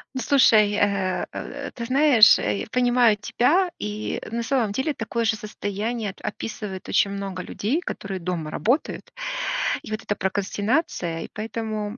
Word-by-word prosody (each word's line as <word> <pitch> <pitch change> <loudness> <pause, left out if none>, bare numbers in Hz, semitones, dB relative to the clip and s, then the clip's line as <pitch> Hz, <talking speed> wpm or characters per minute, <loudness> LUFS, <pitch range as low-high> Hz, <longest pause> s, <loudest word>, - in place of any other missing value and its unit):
Ну 260 - -2
слушай, 225 -6 +5
э, 200 -3 +1
э, 280 0 -6
ты 235 - -6
знаешь, 260 -3 +6
э, 105 -1 -1
я - - -5
понимаю 245 -3 +4
тебя. 300 - +2
И, 210 +1 -3
на 235 +1 -1
самом 235 -4 +1
деле, 265 +8 -1
такое 230 -1 -2
же 220 - +2
состояние 215 +1 -3
ат - - -19
описывает 210 -3 -5
очень 200 - +3
много 195 -2 -4
людей, 260 - -1
которые 195 - -5
дома 170 -3 -3
работают. 245 - -1 0.7
И, - - -9
вот, 215 - -3
эта 205 - -1
прокрастинация, 200 - -1
и - - -7
поэтому, 215 0 -4
215 Hz, 155 wpm, -24 LUFS, 200-245 Hz, 0.7 s, знаешь